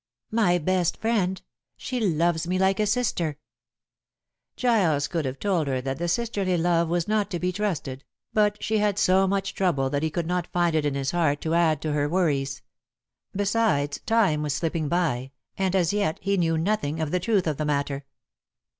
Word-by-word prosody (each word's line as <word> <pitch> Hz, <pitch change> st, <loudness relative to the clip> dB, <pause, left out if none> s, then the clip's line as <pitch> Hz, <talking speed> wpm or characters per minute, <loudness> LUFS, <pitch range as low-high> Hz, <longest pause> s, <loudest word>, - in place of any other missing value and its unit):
"My 210 Hz, -6 st, +3 dB
best 180 Hz, +1 st, 0 dB
friend. 200 Hz, -5 st, 0 dB, 0.4 s
She 255 Hz, -, -4 dB
loves 170 Hz, -4 st, +1 dB
me 185 Hz, +1 st, 0 dB
like 190 Hz, +1 st, +2 dB
a 210 Hz, -, +2 dB
sister." 190 Hz, -, 0 dB, 1.2 s
Giles 180 Hz, -, +2 dB
could 165 Hz, -3 st, -2 dB
have 130 Hz, +1 st, -3 dB
told 180 Hz, -6 st, 0 dB
her 130 Hz, -1 st, 0 dB
that 135 Hz, +2 st, -4 dB
the 175 Hz, -, -1 dB
sisterly 200 Hz, -2 st, 0 dB
love 170 Hz, 0 st, +2 dB
was 170 Hz, 0 st, 0 dB
not 210 Hz, -1 st, +1 dB
to 180 Hz, -, -2 dB
be 180 Hz, +1 st, 0 dB
trusted, 170 Hz, -9 st, -3 dB, 0.3 s
but 210 Hz, -1 st, +1 dB
she 220 Hz, 0 st, +1 dB
had 205 Hz, -1 st, +1 dB
so 190 Hz, 0 st, +3 dB
much 195 Hz, 0 st, -1 dB
trouble 140 Hz, -9 st, 0 dB
that 145 Hz, -1 st, 0 dB
he 160 Hz, -, 0 dB
could 165 Hz, +2 st, -2 dB
not 180 Hz, 0 st, -1 dB
find 175 Hz, -2 st, +1 dB
it 150 Hz, -1 st, +2 dB
in 140 Hz, -, -2 dB
his 135 Hz, -1 st, -1 dB
heart 160 Hz, -5 st, +1 dB
to 160 Hz, -, -1 dB
add 160 Hz, -3 st, +2 dB
to 155 Hz, -1 st, -1 dB
her 145 Hz, 0 st, 0 dB
worries. 140 Hz, -6 st, 0 dB, 0.7 s
Besides, 195 Hz, -8 st, +1 dB
time 210 Hz, -10 st, +3 dB
was 150 Hz, -2 st, -1 dB
slipping 160 Hz, -1 st, -1 dB
by, 135 Hz, -7 st, -1 dB, 0.2 s
and 190 Hz, -1 st, 0 dB
as 180 Hz, -1 st, +2 dB
yet 200 Hz, -6 st, 0 dB
he 200 Hz, +1 st, 0 dB
knew 165 Hz, -3 st, +1 dB
nothing 165 Hz, -3 st, -1 dB
of 155 Hz, -2 st, -2 dB
the 180 Hz, -, +1 dB
truth 200 Hz, 0 st, +1 dB
of 155 Hz, -4 st, -1 dB
the 155 Hz, -, -2 dB
matter. 140 Hz, -1 st, -1 dB
175 Hz, 190 wpm, -25 LUFS, 150-195 Hz, 1.2 s, My